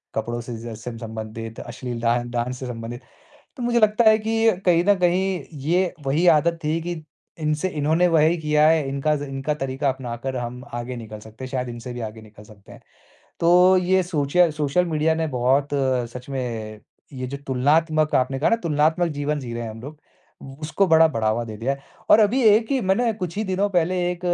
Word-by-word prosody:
कपड़ों 120 +2 -2
से 120 0 -7
जैसे 115 +1 -7
म 115 - -9
संबंधित 110 0 -7
अश्लील 120 -1 -6
डा 115 0 +2 0.2
डांस 120 +1 -2
से 130 - -5
संबंधित। 120 +1 -6 0.6
तो 250 - -5
मुझे 240 0 +2
लगता 215 +2 +3
है 215 - +5
कि 225 +1 +1
अ, 200 - +1
कहीं 175 -2 +4
न 205 - +5
कहीं 180 -1 +1 0.2
ये 180 +3 +1
वही 150 +6 +1
आदत 170 +1 +4
थी 155 +2 0
कि 170 -2 -5 0.4
इनसे 155 +3 0
इन्होंने 160 +2 +2
वही 165 0 +3
किया 150 -1 +3
है 160 -3 +3
इनका 140 +3 0
ज़ 145 - -4
इनका 135 +2 -3
तरीका 135 0 -2
अपना 130 -3 -4
कर 130 -1 -2
हम 125 +1 -5
आगे 120 +1 -4
निकल 110 -2 -8
सकते 110 +4 -12
हैं 130 - -8
शायद 125 -2 -2
इनसे 120 +1 -7
भी 120 - -6
आगे 110 0 -7
निकल 105 -1 -15
सकते 105 -2 -17
हैं। - - -14 0.6
तो 180 +2 +6
ये 185 +1 +2
सोचया 170 0 +2
सोशल 150 +3 0
मीडिया 160 0 +1
ने 160 0 -1
बहुत 135 +4 +2 0.5
सच 125 +2 -9
में 115 -5 -4 0.3
ये 130 -1 -5
जो 140 +2 -5
तुलनात्मक 155 +4 +2
आपने 130 +1 +1
कहा 145 - +2
ना 230 - +4
तुलनात्मक 160 +2 +2
जीवन 145 +1 -1
जी 120 -3 -7
रहे 120 - -4
हैं 115 - -5
हम 110 +1 -10
लोग। 145 +4 -9
व - - -38 0.6
उसको 190 +6 +1
बड़ा 160 0 +6
बढ़ावा 115 -3 0
दे 110 -2 -8
दिया 125 +5 -1
है। 140 - -8 0.3
और 220 - +8
अभी 220 +5 +3
एक 220 +1 +5
ही 270 -2 +1
मैंने 220 +4 +1
कुछ 180 -3 -5
ही 215 - 0
दिनों 195 +1 0
पहले 180 -1 +1 0.2
एक 175 - -5
150 Hz, 210 wpm, -23 LUFS, 120-175 Hz, 0.6 s, और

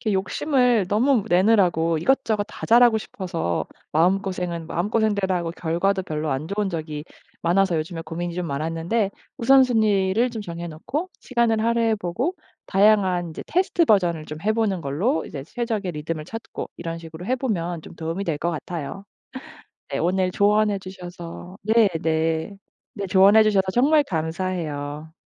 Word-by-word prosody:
이렇게 215 -3 -1
욕심을 240 +2 +2
너무 230 +2 +2
내느라고 175 -4 +3
이것저것 220 0 +1
다 215 - -8
잘하고 235 -1 +6
싶어서 130 - -3 0.3
마음고생은 180 0 0
마음고생대로 200 +1 0
하고 170 -2 -2
결과도 180 +4 0
별로 155 -3 -3
안 135 +3 -2
좋은 200 0 -1
적이 155 -3 -5 0.4
많아서 175 0 +2
요즘에 165 +1 -4
고민이 170 +1 -5
좀 180 -1 -3
많았는데 165 +8 -1 0.3
우선순위를 230 -4 +4
좀 225 -3 -5
정해 170 -1 -6
놓고 250 - -4
시간을 235 -3 +1
할애해 230 -1 +2
보고 235 - -2 0.3
다양한 190 -4 +3
이제 160 - -7
테스트 350 -1 +2
버전을 175 - +2
좀 155 - -7
해 215 - +2
보는 210 -6 0
걸로 175 - 0
이제 140 -3 -7
최적의 215 - -3
리듬을 155 +1 -4
찾고 225 0 -7
이런 165 -1 -5
식으로 165 +1 -9
해 255 - +1
보면 175 -10 -2
좀 - - -12
도움이 165 +4 -3
될 165 -5 -1
것 170 +3 -1
같아요. 170 +2 -5 0.9
네. - - -2
오늘 185 +1 +1
조언해 210 0 +3
주셔서 180 -1 -9
네네 220 +1 +4 1.1
네 200 -1 -3
조언해 200 +3 +6
주셔서 205 -3 +3
정말 290 +6 +4
감사해요. 160 - -3
190 Hz, 345 characters per minute, -23 LUFS, 165-220 Hz, 1.1 s, 잘하고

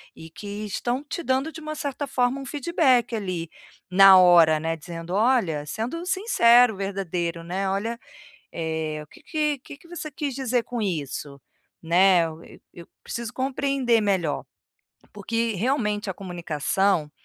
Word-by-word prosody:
e 160 - -11
que 205 +4 -7
estão 240 +6 -2
te 325 +3 -5
dando, 265 +3 0
de 325 - -9
uma 310 0 -5
certa 285 -1 -4
forma, 250 +1 0
um - - -8
feedback, 270 -4 +1
ali, 185 -6 -4 0.4
na 195 0 +8
hora, 170 -3 +6
né. 165 +1 -2
Dizendo: 165 +2 -7
"Olha", 205 - +2
sendo 245 - -4
sincero, 245 - +4
verdadeiro, 180 -4 -3
né, 190 +3 -2
"Olha, 225 +5 -2 0.5
eh, 160 -2 -3
o - - -17
que - - -18
que 300 -2 0
o - - -19
que 280 - -11
que 335 - -20
você 330 -3 -7
quis 280 -2 -4
dizer 250 -3 0
com 240 -1 -5
isso? 145 -6 -4 0.4
Né, 180 +1 +5
eu 160 0 -7
eu - - -15 0.2
eu 170 -1 -12 0.2
preciso 235 -2 -5
compreender 265 -3 +1
melhor". 190 -7 0 0.7
Porque, 225 +2 -2
realmente, 210 -2 -1
a - - -2
comunicação, 175 -1 -1
210 Hz, 155 wpm, -24 LUFS, 170-260 Hz, 0.7 s, na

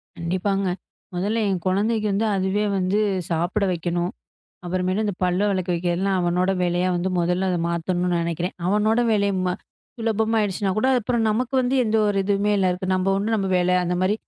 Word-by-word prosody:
கண்டிப்பாங்க. 185 +3 -1 0.5
முதல்ல 205 +6 0
என் 185 -3 -2
குழந்தைக்கு 210 +3 +1 0.3
அதுவே 190 +2 0
வந்து 190 +2 +1 0.3
சாப்பிட 175 +5 0
வைக்கணும். 175 +1 -2 0.5
அப்புறம் 180 +1 -1
இந்தப் 205 -4 -3
பல் 180 0 +1
வெளக்க 185 -2 -1
வைக்கிறதுலாம் 180 +3 0
அவனோட 180 +2 +1
வேலையா 175 +1 +1
வந்து 180 +2 -1
முதல்ல 180 +2 0
அத 180 - 0
மாத்தணுன்னு 175 +1 0
நினைக்கிறேன். 170 +2 -3
அவனோட 210 +4 +2
வேலைய 200 -1 +2
ம 180 - 0 0.4
சுலபமா 225 0 0
ஆயிடுச்சுனாகூட, 205 +2 0
அப்புறம் 235 0 0
நமக்கு 245 +4 -1
வந்து 250 +1 0
எந்த 220 0 +1
ஒரு 205 -1 +1
இதுவுமே 200 +1 +1
இல்ல. 195 -2 +2 0.3
நம்ம 185 +1 +1
உண்டு 210 +3 0
நம்ம 195 -2 -1
வேலை. 180 0 +2
அந்தமாரி 180 +3 +1
190 Hz, 155 wpm, -23 LUFS, 180-210 Hz, 0.5 s, அவனோட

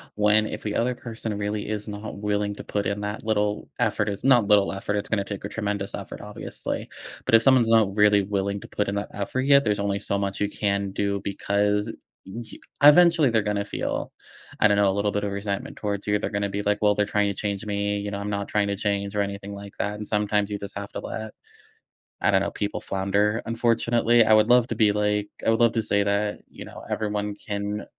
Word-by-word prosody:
when 105 +1 +4
if - - -6
the 105 -1 -3
other 125 +2 +1
person 115 -3 -5
really 105 0 -3
is 105 0 -3
not 105 0 -6
willing 105 0 -1
to - - -8
put 100 -1 -2
in 100 +1 -1
that 105 +2 -4
little 105 -1 -1
effort- 105 0 +1
it's 100 - -5
not 125 -6 +5
little 100 -2 +4
effort, 100 +1 -3
it's 105 - -3
gonna 100 -3 +1
take 100 0 -6
a - - -4
tremendous 100 -2 -3
effort, - - -8
obviously. - - -5 0.4
But 115 - +5
if 115 - +6
someone's 125 -3 +4
not 110 -3 +4
really 105 -1 +5
willing 100 0 -2
to - - -10
put 105 -1 -2
in 100 - -2
that 100 - -3
effort 105 +6 -2
yet, 140 +1 +5
there's 105 -1 0
only 100 0 -1
so 100 - -1
much 100 -1 -2
you 105 - +1
can 100 -1 -1
do 100 0 -1
because, 105 +2 0 0.3
e 110 +3 -9 0.2
eventually, 165 -1 +7
they're 110 -1 +2
gonna 100 -1 -1
feel, - - -3 0.5
I 105 - +6
don't 100 -1 +2
know, 100 -1 +4
a - - -2
little 100 0 0
bit 105 0 -2
of 100 - -2
resentment 100 0 -4
towards 100 -2 -3
you, 105 0 +1
they're 100 - -2
gonna 100 -1 -1
be 100 +1 -3
like, 105 0 +1
"Well, 105 -1 +4
they're 105 - +2
trying 105 -1 +1
to - - -19
change 100 0 -3
me, 100 0 -1
you 100 0 -4
know, 100 - -4
I'm 100 +1 -4
not 100 -1 -2
trying 105 -1 +1
to 100 - -1
change 100 0 -2
or 100 - +2
anything 100 0 -4
like 100 0 -10
that," 105 +1 -1
and 105 0 -6
sometimes 105 -1 +1
you 100 - -3
just 100 0 -7
have 100 0 -6
to - - -4
let, 110 -1 -6 0.9
I - - +3
don't 95 0 +3
know, - - -2
people 105 0 -3
flounder, 100 +3 0
unfortunately- 115 0 +3
I 110 - +5
would 110 +1 +5
love 125 -1 +5
to - - -3
be 105 -3 +4
like 105 0 0 0.2
I - - +3
would 115 - +3
love 115 - +5
to 115 - +1
say 100 -1 +2
that, 100 +1 -1
you - - -10
know, - - -11
everyone 105 -1 -2
can 105 0 -4
105 Hz, 240 wpm, -25 LUFS, 100-110 Hz, 0.9 s, eventually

